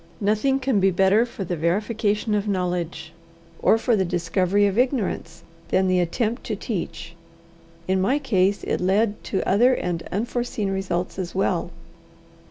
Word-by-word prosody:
Nothing 215 +7 +1
can 260 -5 +1
be 195 0 +4
better 195 +5 +3
for 215 - -6
the 180 -1 -3
verification 210 +5 0
of 210 0 0
knowledge, 180 -3 -2 0.5
or - - +5
for 230 +1 +1
the 195 - +2
discovery 180 +3 +1
of 200 -1 0
ignorance, 210 - -1 0.2
than 190 0 +2
the 185 0 +2
attempt 220 +7 -1
to 215 - -2
teach. 180 -5 -5 0.7
In 190 0 +1
my 255 +9 +2
case 200 -8 +1
it - - -1
led 205 +3 +1
to 190 - -2
other 245 +6 +4
and 175 -5 -2
unforeseen 225 -1 -2
results 185 -1 -2
as 180 -1 -5
well. 195 - 0
195 Hz, 155 wpm, -23 LUFS, 180-225 Hz, 0.7 s, or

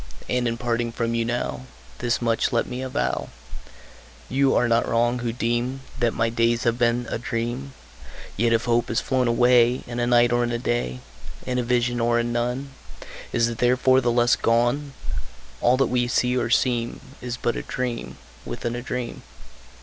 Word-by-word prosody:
And, 125 -1 0
in 115 0 -1
parting 120 -1 -1
from 115 0 -2
you 115 0 +1
now, 70 - -3 0.3
Thus 120 0 0
much 115 -1 +1
let 120 - +1
me 125 +1 -5
avow 130 -1 -2 1.0
You 135 +1 +3
are 120 - +3
not 115 0 +2
wrong, 120 +2 +2
who 120 -1 -2
deem 120 +3 -1 0.2
That 120 -2 +1
my 115 - +2
days 115 0 +1
have 120 0 +1
been 120 0 +2
a - - -2
dream: 120 +4 -3 0.6
Yet 115 +2 +2
if 115 0 +2
hope 120 0 +2
has 115 - 0
flown 130 -2 0
away 120 +1 +4
In 120 0 -5
a 120 - +1
night, 120 -1 +4
or 120 0 +2
in 120 - -1
a 120 - 0
day, 115 - -2 0.4
In 125 0 -1
a - - 0
vision 120 0 +1
or 120 0 +2
in 120 0 -1
none, 125 +3 -2 0.6
Is 115 - +2
it 115 -1 -5
therefore 130 +1 +4
the 120 -1 +1
less 120 0 +4
gone? 120 +5 +1 0.7
All 125 +2 +4
that 135 - +3
we 125 -1 +1
see 125 +1 +1
or 120 -2 0
seem 120 -1 +1 0.2
Is 125 -1 -4
but 120 - -1
a - - -3
dream 125 -2 -4 0.3
within 120 0 -4
a 120 - -4
dream. 125 -1 -4
120 Hz, 190 wpm, -24 LUFS, 115-125 Hz, 1.0 s, away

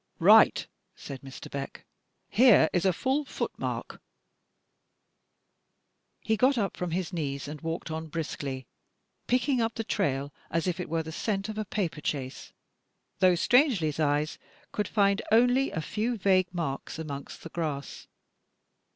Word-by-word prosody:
"Right," - - +6 0.3
said 135 -2 -8
Mr. 135 -1 -9
Beck, 140 -1 -6 0.4
"here 225 -7 +6
is 175 +1 +1
a 190 - +5
ftdl 265 - -1
footmark." - - -4 2.2
He 220 - +1
got 255 +4 +3
up 200 -4 0
from 180 - -3
his 180 +2 -2
knees 140 -5 -3
and 150 0 -7
walked 165 0 -4
on 160 0 -4
briskly, 145 -4 -4 0.6
picking 250 0 +2
up 225 0 -1
the 225 - -2
trail 145 -10 -1 0.2
as 165 -1 0
if 180 0 -1
it 180 - -4
were 165 0 0
the 160 - -7
"scent" 195 +4 -2
of 215 0 -4
a 215 - -2
paper 175 -6 -2
chase, 135 -4 -4 0.7
though 185 -1 +5
Strangely 235 - +3
's 150 - -9
eyes 150 0 +1 0.3
could 210 -2 -1
find 200 -1 +2
only 245 +4 +4
a 160 - -3
few 225 +8 -2
vague 185 -2 +3
marks 165 -7 -4
amongst 145 -3 -7
the 165 - -7
grass. 150 -5 -4
175 Hz, 150 wpm, -28 LUFS, 150-215 Hz, 2.2 s, Right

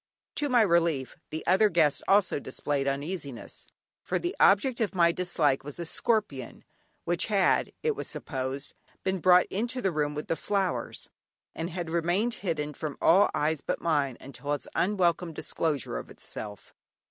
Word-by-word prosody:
To 290 - 0
my 245 -3 +5
relief 170 -8 +1
the 155 - -5
other 195 +4 +5
guests 155 -6 +3
also 195 -6 +3
displayed 140 +1 -2
uneasiness, 140 -2 -4 0.3
for - - -1
the 355 +2 -3
object 235 +5 +4
of 205 -3 0
my 170 -2 +5
dislike 165 -6 +1
was 145 +3 -8
a 170 - -3
scorpion, 160 - -1 0.4
which 175 0 0
had, 200 -4 +2
it 455 -1 +1
was - - -5
supposed, 135 0 -4 0.3
been 190 0 0
brought 180 +1 +6
into 235 +6 -1
the 195 -6 0
room 150 -2 -1
with 150 - -4
the - - 0
flowers, 195 0 -2 0.4
and 165 +1 -4
had 170 -2 -5
remained 175 +8 +1
hidden 150 -5 -2
from 150 -1 -5
all 190 +5 +5
eyes 155 -1 0
but - - -2
mine 145 -6 0
until 140 +2 -5
its 145 - -4
unwelcome 175 -3 +1
disclosure 150 - -2
of - - -10
itself. 105 -2 -8
170 Hz, 160 wpm, -28 LUFS, 145-195 Hz, 0.4 s, brought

